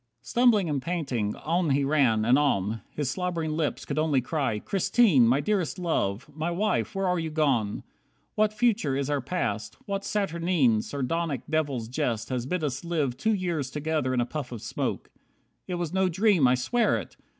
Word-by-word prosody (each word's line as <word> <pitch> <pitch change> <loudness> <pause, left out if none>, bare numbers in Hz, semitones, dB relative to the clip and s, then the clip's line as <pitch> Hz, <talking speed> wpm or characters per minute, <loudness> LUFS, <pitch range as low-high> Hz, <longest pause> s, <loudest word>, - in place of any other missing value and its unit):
60 - - -12
Stumbling 235 -6 +4
and 145 -3 -1
panting, 135 -10 -2
on 170 +2 0
he 140 +1 +2
ran, 135 -7 +2
and 125 +4 +5
on. 110 -6 0
His 145 -4 -2
slobbering 170 0 -2
lips 155 -1 -2
could 145 +1 -2
only 155 -3 +2
cry, 135 -5 -1
"Christine! 190 - +3
My 130 +5 +3
Dearest 195 -5 -1
Love! 135 - -1
My 160 +3 -2
Wife! 205 +4 -1
Where 195 0 0
are 180 -1 +1
you 160 -1 -2
gone? 135 -10 0 0.5
What 215 0 +2
future 215 - +1
is 140 +1 -1
our 145 -1 0
past? 110 - -3
What 200 0 -3
saturnine, 170 - +1
Sardonic 145 +1 -2
devil's 145 -7 -1
jest 115 -2 -2
has 125 -1 -2
bid 180 +2 -2
us 135 -1 -2
live 155 -7 -1
Two 220 +11 +1
years 170 -8 -2
together 150 -2 -1
in 130 - +1
a - - +1
puff 140 -1 -5
of 120 -4 -7
smoke? - - -3 0.6
It 180 - -2
was 175 -2 -3
no 190 -1 +2
dream, 185 - +3
I 125 - +4
swear 225 - +1
it! - - -8
150 Hz, 185 wpm, -27 LUFS, 130-180 Hz, 0.6 s, and